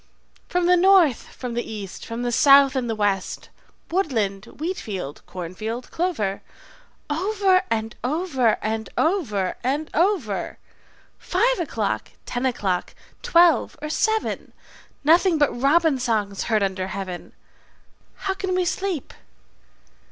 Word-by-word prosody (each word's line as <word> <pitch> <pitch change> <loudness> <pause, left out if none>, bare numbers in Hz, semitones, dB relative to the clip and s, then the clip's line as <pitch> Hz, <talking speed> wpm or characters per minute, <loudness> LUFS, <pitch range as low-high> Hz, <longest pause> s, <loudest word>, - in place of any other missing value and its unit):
"From 355 0 +1
the 360 +1 +5
north, 355 - +4
from 250 -2 -7
the 240 - -1
east, 200 -3 -7
from 230 +1 -4
the 245 - -1
south 275 +1 +6
and 250 -3 -1
the 225 - -1
west, 200 -3 -1 0.4
Woodland, 225 - 0
wheat 335 +9 -4
field, 180 -9 -6
corn 180 -1 -6
field, 225 +5 -5
clover, 255 - -1 0.7
Over 380 +4 +2
and 225 0 -2
over 265 - +1
and 220 0 -2
over 230 - 0
and 285 +5 -1
over, 325 - 0 0.6
Five 470 +6 +1
o'clock, 220 - -2
ten 245 +2 -1
o'clock, 195 -7 -2 0.3
twelve, 345 -9 +4
or 305 - -5
seven, 440 +5 -1 0.5
Nothing 335 +3 +4
but 290 -2 +3
robin 300 0 +3
songs 215 -5 -1
heard 215 -3 +2
under 190 -1 -1
heaven: 190 -2 -6 0.9
How 385 - +1
can 380 -1 -2
we 365 -1 +1
sleep? 365 -4 -2
260 Hz, 130 wpm, -23 LUFS, 215-350 Hz, 0.9 s, south